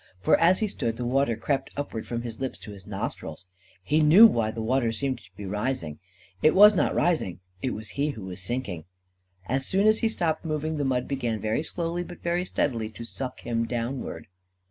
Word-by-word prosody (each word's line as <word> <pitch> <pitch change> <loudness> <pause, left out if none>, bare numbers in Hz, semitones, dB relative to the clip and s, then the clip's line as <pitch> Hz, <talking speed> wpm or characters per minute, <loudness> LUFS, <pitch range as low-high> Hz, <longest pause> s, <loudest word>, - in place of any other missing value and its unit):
For, 90 - +4
as 180 +5 +4
he 215 - +2
stood, 115 - -3
the 125 - -3
water 125 -1 +2
crept 135 +4 -1
upward 140 -6 -4
from 120 0 -3
his 115 -2 -6
lips 130 -1 -3
to 105 - -9
his 100 -2 -11
nostrils. - - -5 0.4
He 150 +10 +2
knew 165 +9 +9
why 115 - +3
the 110 - -6
water 120 0 +1
seemed 130 +2 -2
to - - -19
be 105 - -6
rising. 105 - -3 0.4
It 155 - +4
was 210 +2 +9
not 190 - +1
rising. 155 - +1 0.2
It 130 - -1
was 110 -1 -8
he 140 +10 -1
who 110 -8 -6
was 95 0 -6
sinking. 95 -7 -3 0.6
As 130 +5 -1
soon 195 +2 +2
as 215 0 +5
he 225 - +2
stopped 165 -7 -1
moving, 155 -1 -2
the 145 - 0
mud 125 -2 0
began, 120 -5 -2
very 110 +6 0
slowly, 170 +2 -3
but 175 0 -11
very 175 +1 0
steadily, 115 -10 -1
to 110 +2 -9
suck 130 +2 -6
him 115 -1 -1
downward. 120 +3 -4
130 Hz, 210 wpm, -26 LUFS, 110-155 Hz, 0.6 s, knew